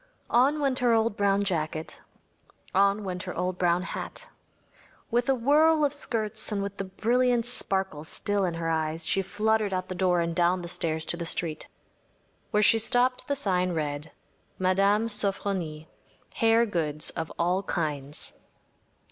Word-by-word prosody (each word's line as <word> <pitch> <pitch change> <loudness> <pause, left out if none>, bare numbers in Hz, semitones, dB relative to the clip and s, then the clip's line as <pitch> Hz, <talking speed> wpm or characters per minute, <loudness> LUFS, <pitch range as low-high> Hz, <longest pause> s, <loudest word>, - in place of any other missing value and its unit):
On 270 +5 +4
went 275 -3 +1
her 245 -2 +3
old 225 -1 +2
brown 200 0 +2
jacket; 160 -4 -2 0.7
on 200 +2 +3
went 180 -2 -4
her 180 - -6
old 180 +1 -2
brown 175 0 +2
hat. - - -6 0.9
With 240 +2 +1
a 270 - +4
whirl 300 +5 +4
of 285 - -1
skirts 220 -6 0
and 200 -1 -1
with 200 0 -6
the 195 - -3
brilliant 240 +4 +1
sparkle 190 -9 0
still 200 +5 0
in 175 -3 -1
her 165 0 -3
eyes, 160 0 -1
she 195 - +1
fluttered 210 0 0
out 185 0 -4
the - - -3
door 180 -1 +1
and 170 0 -1
down 175 +1 +2
the - - -5
stairs 160 -2 -2
to 170 - +1
the 170 - -4
street. 160 -3 -2 0.8
Where 210 0 +2
she 225 +2 +5
stopped 245 +3 +1
the 285 - 0
sign 185 -8 0
read: 150 -1 -3 0.5
“Mme. 195 +4 +2
Sofronie. 195 -7 -1 0.5
Hair 225 +1 +3
Goods 155 -7 -1
of 160 -1 -5
All 180 +3 +1
Kinds. 150 -6 -4
195 Hz, 160 wpm, -27 LUFS, 170-225 Hz, 0.9 s, she